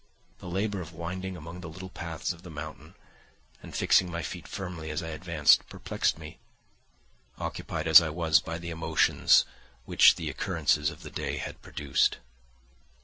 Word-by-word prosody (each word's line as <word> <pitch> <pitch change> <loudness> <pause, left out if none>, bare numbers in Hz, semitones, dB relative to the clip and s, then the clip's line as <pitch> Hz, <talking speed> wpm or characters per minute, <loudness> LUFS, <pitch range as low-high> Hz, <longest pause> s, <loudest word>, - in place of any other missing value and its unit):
The - - -10
labour 95 +2 -2
of 85 -1 -9
winding 90 +3 -5
among 85 +3 -9
the 85 - -7
little 95 +3 -9
paths 85 -1 -4
of 85 - -16
the 90 - -11
mountain 75 - -9 0.7
and - - -10
fixing 90 - +3
my 85 -1 -4
feet 90 +1 -7
firmly 90 -5 -6
as 75 +1 -3
I 80 - -5
advanced 80 -2 +3
perplexed - - -1
me, 80 -1 -11 1.0
occupied 80 -1 -4
as 80 +1 +10
I 80 - -2
was 80 +1 +3
by 80 -2 -5
the 85 0 -6
emotions 80 -1 +3 0.4
which - - +6
the - - -5
occurrences 75 -4 0
of 75 +3 -11
the 75 - -9
day - - -3
had - - -6
produced. 70 -2 0
85 Hz, 165 wpm, -28 LUFS, 80-90 Hz, 1.0 s, as